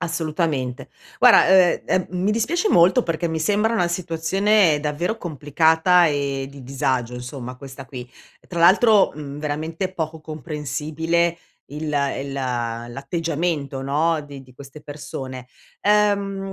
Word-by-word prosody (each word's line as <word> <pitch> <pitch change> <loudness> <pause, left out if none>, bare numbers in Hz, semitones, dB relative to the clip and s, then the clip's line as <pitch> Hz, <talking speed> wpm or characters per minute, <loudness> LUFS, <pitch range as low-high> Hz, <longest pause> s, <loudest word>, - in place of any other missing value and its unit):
Assolutamente. 155 -6 -2 0.3
Guarda, - - +7
uhm, 185 -2 +5
ehm, 185 - 0
mi 185 +3 -1
dispiace 325 - 0
molto 185 - +5
perché 165 -2 -2
mi 160 -1 -3
sembra 210 +7 +1
una 180 -6 +1
situazione 175 +1 +2
davvero 155 +8 -2
complicata 160 +3 +3
e 140 -2 -1
di 140 -1 -12
disagio 130 -2 -2
insomma 125 0 -7
questa 135 0 -10
qui, 125 -2 -9 0.4
tra 170 -2 -4
l'altro, 200 +4 +5
mhmm, 145 -1 -8
veramente 160 +5 -3
poco 160 -2 -4
comprensibile 155 +3 -2 0.3
il 150 +1 -5 0.3
il 140 0 -5
l'atteggiamento 135 +5 -3
no 155 +4 +1
di 145 -2 -10
di 130 -1 -19
queste 140 +3 -12
persone. 130 -4 -8 0.3
Ehm, 200 -2 +1
155 Hz, 125 wpm, -22 LUFS, 140-175 Hz, 0.4 s, Guarda